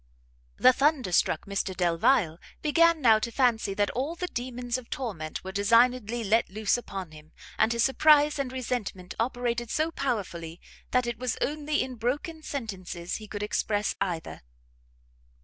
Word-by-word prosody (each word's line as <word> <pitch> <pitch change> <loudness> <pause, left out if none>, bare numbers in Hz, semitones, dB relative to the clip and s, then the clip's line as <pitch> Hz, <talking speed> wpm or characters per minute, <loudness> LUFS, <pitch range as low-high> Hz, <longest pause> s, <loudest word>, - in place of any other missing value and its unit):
The 255 - +6
thunderstruck 260 - +2
Mr 195 -2 -3
Delvile 175 0 +2 0.2
began 335 +1 +4
now 225 -4 +6
to 235 - -2
fancy 230 -5 +1
that 205 0 +1
all 280 +7 -2
the 360 - -3
demons 245 0 -3
of 240 - -15
torment 190 -12 -5
were 190 - -6
designedly 230 +3 +3
let 220 +3 +2
loose 210 +1 +1
upon 195 -8 -6
him, 155 0 -15 0.3
and 220 +1 +4
his 235 -1 +2
surprise 295 +1 +4
and 265 -2 -2
resentment 235 -8 -4
operated 240 0 -1
so 315 +5 0
powerfully 185 - -3 0.3
that 250 -1 +2
it 240 -1 -4
was 250 -2 -2
only 300 +1 0
in 255 -1 -7
broken 295 +8 -2
sentences 190 - -5
he 215 - -10
could 205 0 -5
express 210 0 0
either. 175 -4 -3
235 Hz, 150 wpm, -27 LUFS, 195-260 Hz, 0.3 s, The